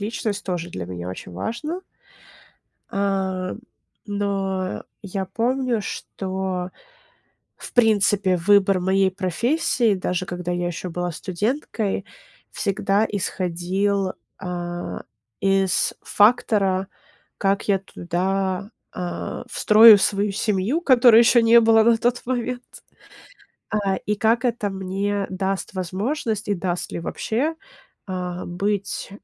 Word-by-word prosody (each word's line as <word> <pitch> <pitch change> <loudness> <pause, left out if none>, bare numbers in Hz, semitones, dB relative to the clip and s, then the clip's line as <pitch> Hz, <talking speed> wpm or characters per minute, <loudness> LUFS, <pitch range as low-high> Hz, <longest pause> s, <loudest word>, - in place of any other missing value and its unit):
личность, 210 0 -3
тоже 175 -2 -3
для 90 - -5
меня 90 -1 -6
очень 90 -1 -8
важно. 270 - -4 1.1
А, 190 -2 -1 0.5
но, 195 -2 -2 0.2
я 195 -1 -4
помню, 240 +3 0
что, 190 -2 -4 0.9
в - - -10
принципе, 205 -5 +3
выбор 195 +1 +4
моей 190 +1 +2
профессии, 220 - +1
даже 180 -1 -2
когда 180 0 -4
я 175 0 -1
еще 175 +1 -5
была 175 +1 -3
студенткой, 205 - -2 0.5
всегда 200 +1 +1
исходил, 190 +1 -1 0.3
а, 175 -1 -5 0.4
из 195 -1 +2
фактора, 205 -4 +3 0.5
как 195 0 0
я 195 -2 +3
туда, 190 +2 -2 0.2
а, 180 -1 -5
встрою 215 0 +8
свою 200 +1 +1
семью, 210 - 0
которой 245 -6 +7
еще 235 +1 +6
не 230 +1 +7
было 225 0 +5
на 230 0 +4
тот 240 +2 0
момент. 250 0 -2 1.1
А, 200 -2 0
и 210 - +1
как 225 +4 +2
это 235 -4 0
мне 195 +1 -2
даст 190 +1 -2
возможность, 210 - -2
и 205 - +2
даст 180 -1 -3
ли - - -3
вообще, 255 - -2 0.5
а, 180 -2 -4
быть, 200 +3 -2
195 Hz, 110 wpm, -23 LUFS, 185-220 Hz, 1.1 s, встрою